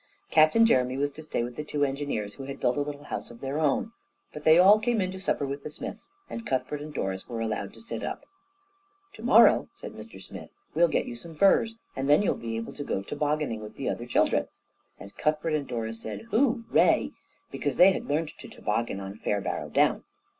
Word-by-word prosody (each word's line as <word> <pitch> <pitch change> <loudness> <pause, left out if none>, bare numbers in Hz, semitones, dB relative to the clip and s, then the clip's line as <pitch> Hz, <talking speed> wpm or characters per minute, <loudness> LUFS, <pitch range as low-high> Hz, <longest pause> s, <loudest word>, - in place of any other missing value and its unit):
Captain 155 +9 +6
Jeremy 130 - +2
was 145 +1 0
to 155 - -10
stay 155 -6 -2
with 120 0 -6
the 150 - -4
two 150 -1 0
engineers, 135 -7 -3
who 135 - -8
had 140 0 -7
built 125 0 +1
a 145 - 0
little 145 0 -5
house - - -5
of 120 - -12
their 135 +3 -3
own, 155 +8 +1 0.4
but 150 - -8
they 160 +1 +7
all 195 +4 +7
came 235 0 +1
in 185 -1 0
to 190 - -7
supper 185 -6 0
with 140 +1 -4
the 150 - -6
Smiths, 150 - -8 0.2
and 230 - -6
Cuthbert 140 +2 -1
and 150 +1 -7
Doris 95 -8 -4
were 115 -2 -4
allowed 105 -3 -2
to - - -13
sit 230 - -5
up. - - -5 0.9
"To - - -12
morrow," - - +6
said - - -7
Mr - - -11
Smith, - - -10 0.2
"we'll 170 +1 +5
get - - 0
you 120 - -6
some 160 +7 -9
furs, 200 +6 +4 0.2
and 135 +1 -2
then 150 +8 +6
you'll - - +2
be 115 -1 -5
able 115 - -5
to 145 - -6
go 95 - -2
tobogganing 145 -3 -1
with 105 - -9
the - - -4
other - - -4
children," - - +2 0.5
and 100 - -12
Cuthbert 155 +1 0
and 150 -2 -1
Doris 115 -2 -4
said 110 - -7
"Hooray!" 235 -2 +3 0.4
because 145 -3 -2
they 185 +2 +8
had - - -3
learned 155 +2 -1
to - - -10
toboggan 105 -1 -2
on 100 +2 -8
Fairbarrow 100 -1 -2
Down. - - +2
145 Hz, 220 wpm, -27 LUFS, 120-160 Hz, 0.9 s, they